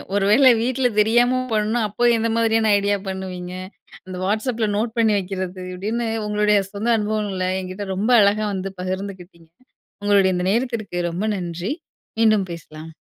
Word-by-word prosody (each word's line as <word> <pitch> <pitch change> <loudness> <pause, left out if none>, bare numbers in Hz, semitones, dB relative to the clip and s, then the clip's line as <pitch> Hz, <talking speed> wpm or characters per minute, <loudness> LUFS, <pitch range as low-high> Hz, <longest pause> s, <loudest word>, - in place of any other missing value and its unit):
ஒரு 200 -1 +2
வேள 260 +4 +7
வீட்ல 255 +1 +1
தெரியாம 240 +4 +3
பண்ணா, 215 +2 +1
அப்போ 240 +4 +2
எந்த 230 +1 0
மாதிரியான 225 -1 +2
ஐடியா 200 0 +1
பண்ணுவீங்க? 185 -1 -6 0.5
அந்த 185 -1 -6
வாட்ஸ் 215 +6 0
அப்ல 225 -1 -1
நோட் 225 +1 -2
பண்ணி 220 -2 +3
வைக்கிறது. 185 -1 -5
அப்படின்னு 220 +6 -2 0.2
உங்களுடைய 210 0 +2
சொந்த 215 +3 -3
அனுபவங்களை 205 -3 -1
என்கிட்ட 185 +2 -6
ரொம்ப 210 +6 0
அழகா 205 +1 +3
வந்து 190 0 -4
பகிர்ந்துக்கிட்டீங்க. 185 -3 -6 0.5
உங்களுடைய 200 -2 +3
இந்த 180 0 -1
நேரத்திற்கு 230 -5 -2
ரொம்ப 180 +5 -3
நன்றி. 175 +4 -4 0.5
மீண்டும் 215 -4 +3
பேசலாம். 160 -1 -10
205 Hz, 145 wpm, -21 LUFS, 185-220 Hz, 0.5 s, வேள